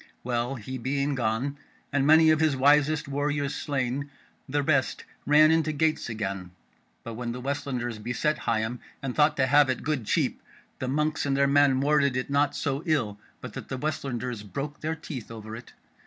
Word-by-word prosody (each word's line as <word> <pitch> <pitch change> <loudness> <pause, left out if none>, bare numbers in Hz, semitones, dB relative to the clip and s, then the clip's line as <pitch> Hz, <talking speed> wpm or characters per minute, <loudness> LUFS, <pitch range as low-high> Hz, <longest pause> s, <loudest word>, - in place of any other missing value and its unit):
Well, 120 +2 -1
he 130 +2 -6
being 140 +3 -1
gone, 125 +3 -1 0.4
and 140 -1 +2
many 160 +1 +7
of 155 - +3
his 155 -3 +3
wisest 145 +2 +3
warriors 145 0 -1
slain, 140 0 -2 0.4
the 145 +1 0
rest 140 -2 +1 0.2
ran 155 +1 +6
into 160 -1 +2
gates 155 -2 0
again; 100 -4 -4 0.5
but 115 - -6
when 120 +1 -4
the 125 - -6
Westlanders 125 -4 -3
beset 125 +7 -1
Higham 115 +2 -1 0.2
and 135 -2 -2
thought 150 0 +3
to 130 - +3
have 145 +1 +5
it 130 - -1
good 140 -6 -2
cheap, - - 0 0.4
the 130 - -3
monks 150 +4 0
and 135 -1 +1
their 140 - +4
men 140 -1 +4
warded 140 -2 +3
it 125 +2 -3
not 145 0 +2
so 140 0 -1
ill 115 -10 0 0.2
but - - -8
that - - -8
the 130 - -3
Westlanders 125 -5 -3
broke 140 +8 -6
their 160 +1 -2
teeth 145 -7 -7
over 110 -1 -8
it. 120 - -11
140 Hz, 185 wpm, -27 LUFS, 125-145 Hz, 0.5 s, many